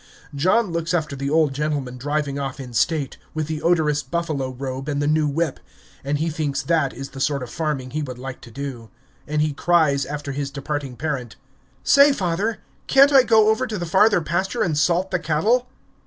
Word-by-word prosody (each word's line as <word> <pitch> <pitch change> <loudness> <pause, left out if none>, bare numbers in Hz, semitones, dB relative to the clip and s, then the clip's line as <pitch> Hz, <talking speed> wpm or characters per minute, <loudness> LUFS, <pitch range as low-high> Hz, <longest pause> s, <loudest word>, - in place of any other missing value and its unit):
John 185 +8 +2
looks 170 +1 -1
after 155 -4 -2
the 140 +1 -3
old 155 -2 +3
gentleman 140 -3 -2
driving 145 0 -2
off 135 0 -4
in 125 -3 -8
state, 145 +4 0 0.2
with 155 -1 -1
the 155 0 -4
odorous 155 -4 +2
buffalo 145 -2 -2
robe 130 +2 -5
and 145 -1 -1
the 145 - 0
new 155 0 +2
whip, 155 0 -1 0.4
and 140 +2 -1
he 160 +3 -1
thinks 145 -3 -2
that 145 -2 +1
is 135 +2 -7
the 135 - -10
sort 140 -2 0
of 120 - -8
farming 145 -5 -3
he 155 - -2
would 130 -4 -5
like 130 0 -7
to - - -12
do. 120 -2 -7 0.4
And 150 0 +1
he 155 -1 -1
cries 155 -4 +2
after 145 -1 -5
his 140 0 -3
departing 140 -2 -4
parent, 135 -5 -4 0.5
"Say, 280 - +6
father, 200 +1 -1 0.3
can't 275 +1 +6
I 270 - +9
go 220 -3 +4
over 250 +4 +1
to 215 -3 -4
the 175 - -3
farther 190 +3 +4
pasture 175 +5 -1
and 160 -4 0
salt 175 +5 +1
the 180 - +1
cattle?" 210 +12 +1
150 Hz, 200 wpm, -22 LUFS, 140-170 Hz, 0.5 s, I